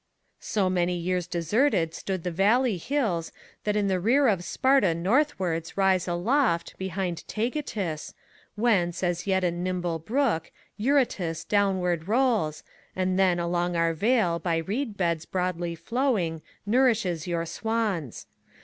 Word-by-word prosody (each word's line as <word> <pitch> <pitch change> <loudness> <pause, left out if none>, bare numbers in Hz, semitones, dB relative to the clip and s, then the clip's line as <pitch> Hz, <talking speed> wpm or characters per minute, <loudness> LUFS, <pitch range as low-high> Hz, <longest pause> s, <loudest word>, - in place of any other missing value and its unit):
So 200 -3 0
many 180 -1 +1
years 180 0 -1
deserted 170 - +1
stood 185 -1 -4
the 180 - -2
valley 210 +5 +2
hills 185 - -1 0.3
That 210 0 +1
in 205 -1 +1
the 190 -1 +1
rear 255 +9 +3
of 190 -4 0
Sparta 260 -7 +2
northwards 185 - 0
rise 190 -2 +2
aloft, 180 +2 +1
Behind 190 -2 -3
Taygetus; 215 - -3 0.4
whence, 195 -6 +1
as 175 +1 -1
yet 190 -1 +2
a 175 - +2
nimble 175 -1 -2
brook, 220 - 0 0.2
Eurotas 210 - 0
downward 185 -5 +1
rolls, 220 - +1 0.3
and 185 0 0
then, 185 -2 +4
along 175 0 -1
our 165 0 +2
vale 190 -2 +2
By 170 -2 0
reed 210 - -3
beds 170 -3 -1
broadly 180 -2 -2
flowing, 180 - -1 0.2
nourishes 210 - +2
your 170 -1 -1
swans. 205 - -2
185 Hz, 130 wpm, -26 LUFS, 170-220 Hz, 0.4 s, then